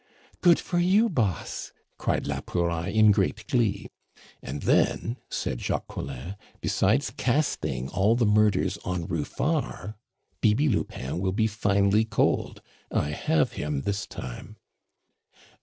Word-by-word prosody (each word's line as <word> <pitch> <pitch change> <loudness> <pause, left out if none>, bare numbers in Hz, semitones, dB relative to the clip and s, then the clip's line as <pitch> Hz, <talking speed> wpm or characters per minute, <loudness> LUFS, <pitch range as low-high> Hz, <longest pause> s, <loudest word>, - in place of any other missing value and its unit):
"Good 175 -2 +6
for 175 - -1
you, 200 +6 +4
boss!" 110 - -2 0.3
cried - - 0
la - - -2
Pouraille 85 0 -1
in 110 -1 +7
great 100 +2 0
glee. 120 -8 +1 0.5
"And 70 +2 -6
then," 115 +3 +2
said 60 - -3
Jacques - - -2
Collin, 85 +11 -6 0.2
"besides 110 +9 +1
casting 130 - 0
all 100 +7 +2
the 120 -1 +2
murders 105 -2 +2
on 90 -2 -2
Ruffard 105 - -2 0.5
Bibi 115 +8 +3
Lupin 70 - -2
will 95 0 0
be 110 +2 +2
finely 105 -1 +2
cold. 110 -1 0 0.3
I 75 - 0
have 80 +1 +1
him 75 -2 -3
this 100 +3 -2
time." - - -8
100 Hz, 125 wpm, -26 LUFS, 90-120 Hz, 0.5 s, in